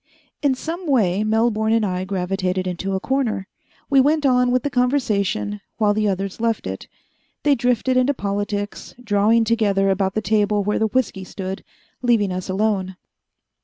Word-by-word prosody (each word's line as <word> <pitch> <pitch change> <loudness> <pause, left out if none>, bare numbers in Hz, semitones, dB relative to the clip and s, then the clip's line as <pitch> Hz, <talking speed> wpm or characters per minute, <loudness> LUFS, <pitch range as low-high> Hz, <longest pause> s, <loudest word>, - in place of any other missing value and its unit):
In 280 -3 +2
some 335 +6 -5
way 210 -8 +2
Melbourne 220 0 +1
and 225 -1 +2
I 185 -1 -2
gravitated 185 -1 -1
into 185 +2 -3
a - - 0
corner. 235 -5 -1 0.4
We 275 -2 +5
went 295 +2 +2
on 250 -2 +4
with 250 0 +1
the 285 - -2
conversation 215 -6 0 0.2
while 210 -2 +3
the 215 0 +1
others 195 +2 -3
left 230 -1 0
it. - - -6 0.6
They 290 - +4
drifted 250 0 +1
into 260 +3 +2
politics, 205 0 -3
drawing 220 +1 +3
together 205 -4 +2
about 190 0 0
the 215 - +1
table 210 0 +2
where 210 +1 0
the 220 - +2
whisky 210 -4 -1
stood, 190 0 -6 0.4
leaving 230 -6 +2
us 185 +1 -4
alone. 190 -1 0
210 Hz, 165 wpm, -21 LUFS, 195-245 Hz, 0.6 s, We